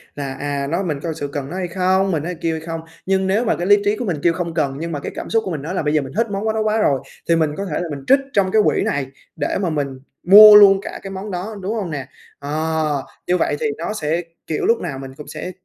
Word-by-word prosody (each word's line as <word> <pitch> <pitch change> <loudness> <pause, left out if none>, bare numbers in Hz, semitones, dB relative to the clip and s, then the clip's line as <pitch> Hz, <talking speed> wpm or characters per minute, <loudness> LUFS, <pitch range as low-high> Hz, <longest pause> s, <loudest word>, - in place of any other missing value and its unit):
là: 140 -2 -4
"À, 140 -1 -2
nói 170 +6 -1
mình 155 -6 -2
có 165 - -5
thực 160 - -4
sự 145 - -3
cần 140 -1 -5
nó 175 - -6
hay 185 -1 -2
không, 190 +2 +1
mình 155 -4 -1
nói 175 +2 -4
kêu 165 -1 0
hay - - -8
không?" 165 -1 -4 0.2
Nhưng 190 0 +1
nếu 210 +5 +1
mà - - +2
cái 175 - -3
lý 205 0 +7
trí 205 +1 +2
của 245 - -4
mình 175 -7 -1
kêu: 170 - +4
"Không 170 -1 -4
cần!", 140 -4 -1
nhưng 165 +1 -4
mà 150 - -3
cái - - -6
cảm - - -6
xúc 225 -1 +1
của 190 - -3
mình 155 -4 -4
nói 160 +5 -5
là - - -1
"Bây 150 0 0
giờ 155 - +3
mình 135 -1 -8
thích 230 +1 +2
món 210 +2 -1
đó 220 - -1
quá 215 0 +1
rồi!", 140 -11 +2 0.3
thì 170 - +5
mình 160 -2 +2
có 200 - -3
thể 155 -6 -3
là 175 - -4
mình 140 -2 -6
trích 270 +1 +6
trong 195 -2 +2
cái 220 - +4
quỹ - - +2
này 140 -2 -1 0.3
để 145 - -1
mà 185 - 0
mình 140 -4 -3 0.2
mua 210 +3 +10
luôn 195 -2 +8
cả - - -7
cái 195 - -7
món 195 +2 -6
đó, 190 +4 -5
đúng 195 +4 -3
hông 195 -7 -3
nè? 140 -3 -5 0.3
Ờ, 155 -1 -1 0.2
như 180 - +2
vậy 155 - 0
thì - - -2
nó 170 +6 -3
sẽ, 165 -3 -1 0.3
kiểu, 155 - -2
lúc 230 - +3
nào 135 - -5
mình 135 -1 -8
cũng 150 - -11
sẽ 155 +4 -6
170 Hz, 305 wpm, -20 LUFS, 150-195 Hz, 0.3 s, mua